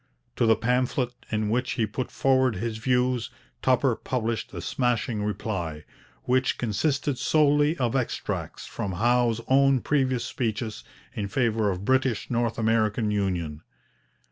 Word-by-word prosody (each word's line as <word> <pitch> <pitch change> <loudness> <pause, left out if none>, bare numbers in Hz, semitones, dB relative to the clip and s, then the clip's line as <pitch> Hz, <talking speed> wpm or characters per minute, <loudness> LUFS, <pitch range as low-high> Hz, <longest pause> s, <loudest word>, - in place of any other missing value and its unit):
To 115 - +3
the 110 - +6
pamphlet 125 +2 0 0.2
in 110 -1 0
which 125 +2 0
he 115 - +1
put 110 +5 -4
forward 130 -3 +2
his 110 +3 -3
views 125 0 +1 0.3
Tupper 130 -1 +3
published 115 -4 -3
a - - -6
smashing 120 -3 -1
reply, 95 -7 -3 0.4
which 130 +1 +1
consisted 130 +4 0
solely 150 +1 +3
of 125 -2 0
extracts 130 -3 -3
from 95 - -4
Howe's 120 +3 +2
own 135 0 +4
previous 130 -4 +1
speeches 110 -3 -3 0.3
in 105 -5 -3
favour 110 -1 +1
of 95 +1 -3
British 130 -3 +1
North 120 -1 0
American 110 -1 +1
union. 90 -7 -2
120 Hz, 135 wpm, -26 LUFS, 110-130 Hz, 0.4 s, the